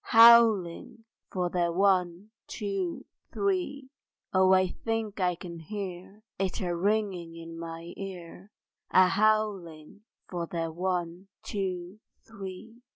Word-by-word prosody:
Howling 225 -4 +6 0.3
for 180 -2 -1
their 175 -1 +1
One, 185 +1 +1 0.2
Two, 195 -5 -3 0.3
Three! 350 -9 -2 0.4
Oh 190 0 +5
I 185 0 +5
think 225 -1 -3
I 180 -1 +1
can 170 -1 -9
hear 195 +3 -7 0.2
It 190 -2 -1
a 175 -2 -1
ringing 190 -3 -1
in 165 0 -9
my 165 +1 -7
ear, 190 0 -9 0.4
A 185 0 +6
howling 205 -5 0 0.3
for 175 -2 -4
their 165 -1 -3
One, 175 +1 -3 0.2
Two, 185 -1 -4 0.3
Three! 210 +3 -9
185 Hz, 115 wpm, -28 LUFS, 175-210 Hz, 0.4 s, Howling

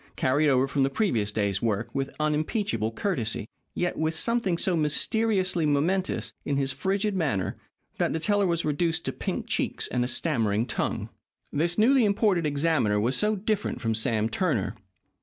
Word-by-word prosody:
carried 145 +4 +2
over 130 0 +3
from 140 0 -1
the 135 - +3
previous 120 - 0
day's 100 -2 -1
work 110 -1 -1
with 135 0 -3
unimpeachable 150 - 0
courtesy, 115 - -2 0.3
yet 175 0 -1
with 160 +1 0
something 230 -6 +2
so 180 +1 +1
mysteriously 185 +3 +1
momentous 160 +6 0
in 140 - -1
his 135 -1 0
frigid 195 +8 -1
manner, 110 - -1 0.4
that - - +1
the 160 - -1
teller 205 +3 +2
was 170 -1 0
reduced 160 +2 0
to - - 0
pink - - -3
cheeks - - -1
and 125 - 0
a - - -1
stammering 115 -6 +1
tongue. - - -2 0.4
This 170 +4 0
newly 250 +4 +5
imported 200 -5 +2
examiner 140 -8 +1
was 120 +5 +1
so 210 +1 +1
different 210 +1 -2
from 115 -1 -1
Sam 110 -1 +1
Turner. 115 - -1
155 Hz, 165 wpm, -26 LUFS, 120-190 Hz, 0.4 s, newly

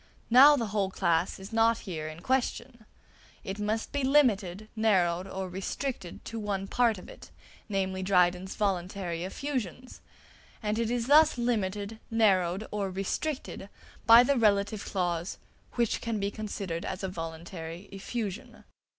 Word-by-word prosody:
Now 275 +5 +9
the 240 -5 -1
whole 200 -3 +1
class 170 -2 0
is 195 +3 -10
not 225 0 +4
here 160 -5 -4
in 155 +2 -8
question; 245 -2 -2 0.6
it 195 +2 -5
must 215 +2 -2
be 285 -1 -1
limited, 215 -8 +2
narrowed, 185 -5 +2
or 190 0 -4
restricted, 190 +2 -5
to 230 - -5
one 200 -2 -2
part 235 -1 +2
of 180 - -11
it, - - -12 0.4
namely 190 -2 -1
Dryden's 180 0 +2
voluntary 180 -3 -2
effusions; 250 +2 -5 0.6
and 210 +1 0
it 230 -1 0
is 240 -1 -1
thus 300 +1 +6
limited, 215 -3 -1
narrowed, 195 -3 +2
or 205 -2 -2
restricted, 195 +3 -3 0.4
by 230 +1 +10
the 275 +2 +2
relative 205 -2 +2
clause 175 -2 -2 0.4
"which 235 -3 0
can 230 -2 -2
be 200 0 -1
considered 200 -6 -4
as 190 +1 -5
a - - 0
voluntary 165 0 -7
effusion." 200 0 -5
200 Hz, 140 wpm, -29 LUFS, 185-230 Hz, 0.6 s, by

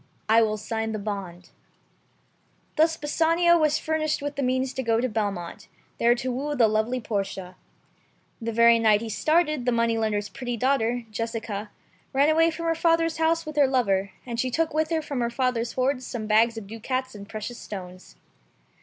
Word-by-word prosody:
I 225 +1 +5
will 215 -1 +1
sign 220 +1 -3
the - - -2
bond." 195 -4 -6 1.2
Thus 320 +1 +3
Bassanio 330 +3 +3
was 305 -1 +3
furnished 310 -1 -1
with 290 0 -4
the 280 - -2
means 260 0 0
to 265 - -3
go 230 -2 +1
to 255 - +1
Belmont, 205 -7 -3 0.3
there 235 +1 +4
to 255 +1 -3
woo 285 +4 -2
the 235 -4 +5
lovely 220 +4 0
Portia. 195 -4 -4 0.9
The 230 0 -2
very 235 +1 +5
night 215 -2 +4
he 230 - -5
started, 305 0 +1
the - - +4 0.4
Jew's 205 0 -1
pretty 245 0 -5
daughter, 245 -1 +1
Jessica, 225 -2 -4 0.4
ran 280 +3 +4
away 325 +1 +4
from 335 +1 -5
her 330 - +2
father's 330 0 +2
house 325 +1 +1
with 305 -1 -7
a - - +4
Christian 275 -2 +4
lover, 200 -6 +2 0.2
and 235 -2 -5
she 255 - +1
took 320 +5 0
with 310 0 +1
her 320 -2 0
from 280 -4 -3
her 235 - 0
father's 240 -1 -1
hoards 255 0 0
some 225 -3 -4
bags 225 +2 +3
of 220 - -6
ducats 255 +5 -4
and 200 -1 -10
precious 220 +2 -6
stones. 185 -2 -9
240 Hz, 185 wpm, -25 LUFS, 215-295 Hz, 1.2 s, I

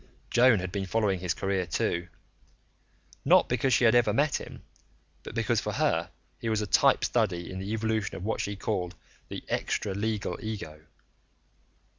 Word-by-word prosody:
Joan 120 -1 +6
had 95 -1 -4
been 100 -1 -3
following 100 -2 +1
his 90 -1 -1
career, 95 -2 -1
too, 85 +2 -1 1.2
not - - +5
because 125 +2 +1
she 125 - +4
had 115 - +6
ever 120 -3 +4
met 145 +6 +1
him, - - -10 0.6
but - - -9
because - - +1
for - - -3
her - - +1 0.3
he 115 - -3
was 110 -1 +1
a 105 - -1
type - - +4
study 85 -1 0
in 95 - -5
the 95 +2 -5
evolution 110 -2 -1
of 90 - -6
what 110 - -1
she 100 - -3
called 90 -3 -2 0.3
"the - - -6
extra 100 - -1
legal 105 +1 -2
ego." 80 -9 -6
100 Hz, 170 wpm, -28 LUFS, 95-110 Hz, 1.2 s, Joan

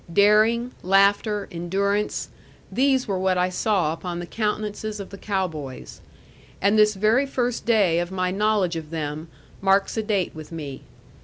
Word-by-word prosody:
Daring, 215 +6 +4
laughter, 200 +2 +2
endurance 200 +4 -1 0.4
these 265 0 +2
were 195 -3 -1
what 185 -1 +1
I 180 0 +2
saw 185 -4 +1
upon 175 +1 -5
the 175 - -5
countenances 215 +1 -3
of 200 - -8
the 200 - -8
cow 195 -3 -1
boys. 145 -6 -9 0.6
And 200 +2 +3
this 210 -1 +4
very 220 +8 +2
first 245 -3 -2
day 200 -8 +3
of 175 0 -2
my 185 -1 -1
knowledge 200 -3 +1
of 160 -2 -6
them 155 0 -4 0.3
marks 195 +2 +2
a - - +2
date 205 -4 -1
with 155 0 -10
me. 145 -5 -6
195 Hz, 160 wpm, -24 LUFS, 175-215 Hz, 0.6 s, Daring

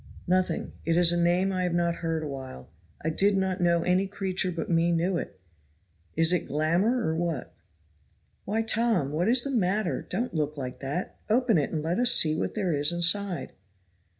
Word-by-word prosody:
"Nothing. 180 -2 0
It 165 0 +1
is 175 -1 +5
a 175 0 +1
name 180 +3 +2
I 185 - -1
have 180 -1 -1
not 170 -1 0
heard 165 -1 -2
a - - -4
while. 130 - -8 0.3
I 160 - 0
did 195 +4 +2
not 190 -1 -1
know 170 -1 +2
any 185 +2 +1
creature 190 -2 -2
but 165 - -4
me 170 0 +2
knew 170 +2 +1
it; 95 - -8 0.8
is 165 +2 +3
it 180 - -1
glamour, 175 - +1
or 160 - 0
what?" 165 -5 -3 0.9
"Why, 220 +3 -1
Tom! 220 - +1
what 165 +5 0
is 245 0 +5
the 280 - -2
matter? 205 -4 0
don't 245 +2 -3
look 150 -2 -2
like 130 -2 -6
that. 145 +7 -4
Open 230 -4 +3
it, 145 - -1
and 155 -2 -3
let 170 +5 -1
us 245 -1 +5
see 155 -1 +4
what - - -3
there 190 -6 0
is 145 +1 +2
inside." 175 +2 +1
175 Hz, 195 wpm, -27 LUFS, 160-195 Hz, 0.9 s, is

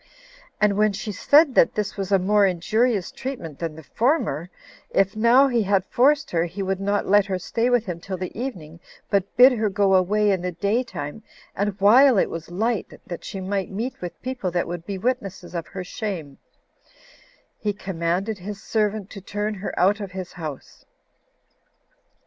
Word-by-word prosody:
And 210 -1 +2
when 215 -1 +3
she 215 +1 -4
said 285 - +4
that 165 - +4
this 210 -1 -2
was 195 -1 -4
a 195 - +6
more 205 +3 +3
injurious 200 +3 +1
treatment 235 - -6
than 165 -2 -4
the 160 - -11
former, 230 - 0 0.4
if, 195 +1 +1
now 235 +5 +5
he 240 -3 +1
had 195 -2 +1
forced 285 +6 +2
her, 165 -1 +1
he 190 +3 -5
would 190 0 -1
not 200 +1 0
let 205 +1 +4
her 190 -2 -1
stay 230 +6 -1
with 245 -2 +2
him 175 -3 -5
till 185 +2 -5
the 185 0 -6
evening, 175 - -6 0.3
but 200 0 0
bid 255 +2 +9
her 220 -4 0
go 200 -1 +2
away 205 +3 +3
in 190 -2 0
the 180 0 -3
day 200 +8 +1
time, 185 - -7 0.3
and 200 0 -2
while 240 +5 +6
it - - +2
was 165 0 -6
light, 220 +4 -2
that 175 - -7
she 195 - -6
might 190 0 -2
meet 225 +7 -4
with 175 -1 -7
people 250 -7 -3
that 175 0 -1
would 175 0 -6
be 200 -1 -3
witnesses 195 -5 -3
of 165 -3 -4
her 185 - -6
shame, 180 - -5 1.2
he 210 - -1
commanded 190 +1 -2
his 200 +2 -7
servant 210 -2 -1
to 195 - -8
turn 210 +3 -3
her 195 0 -5
out 195 +4 +3
of 195 -3 -6
his 185 -2 -6
house. 155 -6 -8
200 Hz, 185 wpm, -23 LUFS, 180-220 Hz, 1.2 s, bid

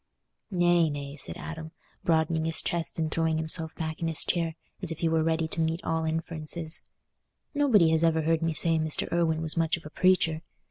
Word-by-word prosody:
"Nay, 175 -3 +3
nay," 140 -1 -5
said 150 - -3
Adam, 160 -1 -7 0.3
broadening 160 -1 +1
his 165 0 +2
chest 170 -2 -2
and 160 -1 -1
throwing 160 -1 +1
himself 160 0 0
back 160 0 -4
in 165 - 0
his 160 -2 +2
chair, 165 -2 0 0.3
as 180 -4 -3
if 165 - -4
he 165 - 0
were 160 0 +2
ready 160 0 +1
to 165 - -1
meet 160 +1 0
all 160 0 -1
inferences, 160 0 -3 0.7
"nobody 235 - +4
has 160 0 +2
ever 160 -1 +3
heard 165 +1 +1
me 165 -1 0
say 165 0 +3
Mr. 155 -1 0
Irwine 165 -2 +1
was 160 - 0
much 165 0 +2
of 165 - -14
a 150 - -9
preacher. 170 -4 +2
160 Hz, 200 wpm, -28 LUFS, 160-165 Hz, 0.7 s, nobody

